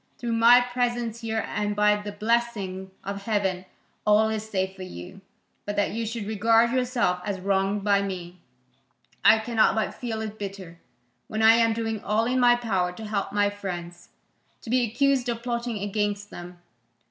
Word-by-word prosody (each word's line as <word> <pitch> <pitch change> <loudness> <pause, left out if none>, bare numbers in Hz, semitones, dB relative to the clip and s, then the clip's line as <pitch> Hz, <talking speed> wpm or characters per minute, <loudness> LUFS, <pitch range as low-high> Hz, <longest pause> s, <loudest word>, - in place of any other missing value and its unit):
Through 240 -1 -3
my 235 +2 +7
presence 240 -2 -2
here 225 -1 -2
and 205 0 -2
by 210 0 +4
the 205 0 -6
blessing 205 -3 -1
of 200 0 -6
heaven, 195 -4 -1 0.4
all 210 +1 +4
is 220 0 -4
safe 190 -2 -2
for 190 - -11
you: 185 - -9 0.4
but 205 - -4
that 205 - +1
you 225 +1 -3
should 225 -1 -4
regard 225 +2 +3
yourself 245 -8 0
as 195 0 -3
wronged 195 +1 0
by 200 -1 +3
me, 180 -2 -6 0.8
I 225 - +7
cannot 220 0 +2
but 220 -1 -1
feel 225 -3 -4
it 215 0 -7
bitter, 190 -4 -7 0.5
when 220 0 -2
I 220 +1 +8
am 230 -1 +3
doing 225 -2 -3
all 215 +2 +1
in 255 +2 +1
my 245 -1 +6
power 195 -7 -1
to 220 +5 -9
help 210 -2 -2
my 205 0 +2
friends, 175 -3 -7 0.5
to 230 - -6
be 255 0 +3
accused 260 +2 +1
of 235 0 -3
plotting 235 -2 -2
against 205 0 -2
them. 175 0 -9
210 Hz, 175 wpm, -25 LUFS, 195-230 Hz, 0.8 s, I